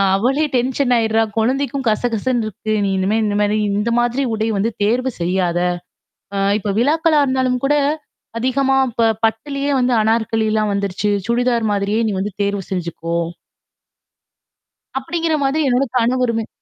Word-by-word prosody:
அவளே 265 +9 +1
டென்ஷன் 250 +1 +1
ஆயிடுறா! 225 -1 +2 0.2
குழந்தைக்கும் 270 +4 0
கசகசன்னு 230 +1 0
இருக்கு. 215 +1 -5
நீ - - 0
இனிமே 195 +3 +1
இந்தமாரி, 210 0 +1 0.2
இந்த 225 +3 0
மாதிரி 240 +3 0
உடை 220 0 -1
வந்து 205 +4 +1
தேர்வு 250 +5 +1
செய்யாத! 175 0 0 0.8
அ - - -1 0.2
இப்ப 205 -1 -2
விழாக்களா 310 +4 +3
இருந்தாலும் 260 -1 +1
கூட 285 +2 +3 0.6
அதிகமா 270 +2 +1
இப்ப 230 -1 +2 0.2
பட்டுலயே 275 +6 -2
வந்து 250 0 +2
அனார்கலிலாம் 220 -1 +1
வந்துருச்சு, 200 +1 -1 0.2
சுடிதார் 235 -1 +1
மாதிரியே 205 +2 0
நீ - - -1
வந்து 205 +2 -3
தேர்வு 200 0 -1
செஞ்சுக்கோ! 170 -2 -3 1.8
அப்பிடிங்கிற 325 +4 -1
மாதிரி 290 +3 +1
என்னோட 250 +3 +2
கணவருமே 235 -2 +1
230 Hz, 130 wpm, -19 LUFS, 210-260 Hz, 1.8 s, விழாக்களா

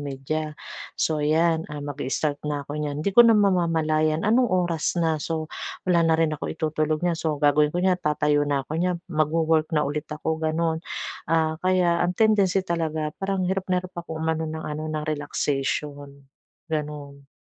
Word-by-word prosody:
media, 150 +2 -4 0.4
so, 155 -2 0
ayan, 160 +2 +2
ah, 145 -1 -6
mag-i-start 145 +1 -2
na 145 -1 -2
ako 145 +2 -5
niyan, 150 0 -3
hindi 200 - +1
ko 240 - +9
na 225 - +6
mamamalayan 165 -5 +2
anong 240 +3 +3
oras 175 -3 0
na. 160 -3 +1
So, 160 0 -3 0.4
wala 180 -2 +3
na 160 - +4
rin 160 -1 +2
akong 155 - -4
itutulog 155 +1 -1
niyan. 170 -2 +1
So, 155 -2 -1
gagawin 150 +1 +3
ko - - +1
niyan, 185 -1 +2
tatayo 150 -2 +2
na 140 -2 0
ako 150 - -9
niyan, 180 0 +1 0.2
mag-wo-work 155 +1 +2
na 150 - +3
ulit 145 +1 -3
ako, 160 +1 -3
gano'n. 160 0 0 0.5
Ah, 160 -1 +1
kaya 180 -2 +2
ang 175 0 0
tendency 200 -4 +3
talaga 160 -3 -2
parang 195 -1 -1
hirap 190 +1 -2
na 180 0 +1
hirap 185 - -9
ako 160 -2 -7
umano 160 0 -1
ng 160 0 -5
ano, 155 +1 -4
ng 155 -1 -3
relaxation, 145 -1 -3 0.5
gano'n. 145 -2 -5
155 Hz, 175 wpm, -24 LUFS, 150-170 Hz, 0.5 s, ko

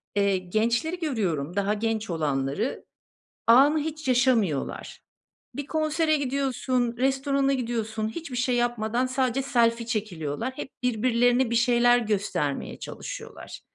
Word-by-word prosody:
Eee, 200 -1 +2
gençleri 230 - -1
görüyorum, 185 - -2
daha 200 +1 +1
genç 220 0 -2
olanları. 150 - -2 0.6
Anı 275 +7 +6
hiç 310 -1 -5
yaşamıyorlar. 240 - +1 0.5
Bir 285 -1 -5
konsere 310 0 +1
gidiyorsun, 255 -3 -1
restorana 270 +1 +1
gidiyorsun, 225 -3 -2
hiçbir 275 +1 -6
şey 245 +1 +1
yapmadan 240 +1 0
sadece 260 0 0
selfie 235 -3 +1
çekiliyorlar. 210 - -3
Hep 280 - -6
birbirlerine 245 +1 +2
bir - - 0
şeyler 240 0 +4
göstermeye 200 - -2
çalışıyorlar. - - -8
240 Hz, 115 wpm, -26 LUFS, 215-265 Hz, 0.6 s, Anı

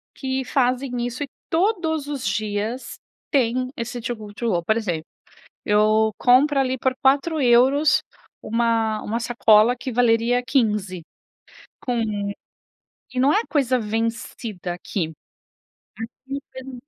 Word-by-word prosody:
que 265 -1 -2
fazem 250 -1 0
isso 245 +4 -4
e - - -5 0.2
todos 325 -5 0
os 280 -3 -4
dias 215 +3 -3 0.3
tem 255 -2 +1
esse 240 +1 -4
Too 240 +1 -3
Good 210 -2 -10
to 235 -1 -2
Go. 175 -3 0
Por 220 +6 +2
exemplo, 175 -8 -2 0.6
eu 215 +1 +3
compro 275 +3 +4
ali 260 -1 +1
por 260 +1 0
4€ 275 0 +4 0.4
uma 225 -1 0
uma 230 +3 -2
sacola 230 0 +4
que 260 +1 -5
valeria 240 +1 +3
15€ 210 - 0 0.8
com 245 -2 -1 1.1
e 255 - -4
não 280 +3 +4
é 430 - +3
coisa 270 -4 +2
vencida 225 -4 -3
aqui. 175 -2 -4 1.2
Aqui 275 +1 -3
tem 260 0 -9
um 265 - -8
245 Hz, 130 wpm, -23 LUFS, 220-265 Hz, 1.2 s, compro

